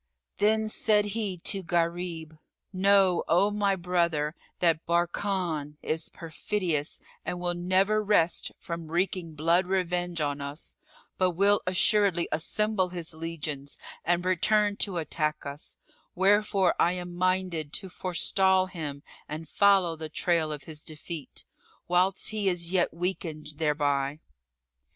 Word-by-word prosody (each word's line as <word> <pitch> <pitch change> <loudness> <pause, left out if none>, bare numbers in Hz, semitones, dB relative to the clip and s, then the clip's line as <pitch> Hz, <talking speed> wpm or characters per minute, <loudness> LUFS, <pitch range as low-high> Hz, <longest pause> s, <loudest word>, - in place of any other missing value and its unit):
Then 220 +1 +2
said 215 -1 +2
he 210 -5 -2
to 195 +3 0
Gharib, 170 -2 -2 0.3
"Know, 190 -1 +4
O 195 +5 +3
my 205 -1 +1
brother, 170 -4 0 0.2
that 165 -2 +2
Barkan 170 -3 -1
is 160 +1 -2
perfidious 165 -1 -2 0.2
and 180 - -4
will 175 0 -1
never 190 +4 +2
rest 185 -5 +2
from 170 -1 -6
wreaking 175 -1 -1
blood 170 +4 +2
revenge 180 -2 -1
on 145 -1 -1
us, 140 +3 -7 0.4
but 185 -1 +2
will 200 +3 +4
assuredly 185 -1 +4
assemble 195 +4 0
his 170 -2 -6
legions 155 -3 -5 0.3
and 175 +1 +1
return 205 +3 +2
to 195 -4 +1
attack 155 -1 -2
us; 140 +1 -6 0.4
wherefore 195 -1 +3
I 175 - +4
am 180 -1 -6
minded 180 -4 0
to 195 - -3
forestall 185 +1 +2
him 150 -6 -6 0.3
and 155 +2 -6
follow 195 -2 +4
the 160 -1 -6
trail 165 -1 +1
of 145 -2 -5
his 150 0 -9
defeat, 155 -1 -7 0.4
whilst 185 +2 +2
he 210 -2 +1
is 175 -1 -1
yet 185 -2 +2
weakened 170 -3 -4
thereby." 145 -2 0
175 Hz, 130 wpm, -28 LUFS, 160-190 Hz, 0.4 s, Know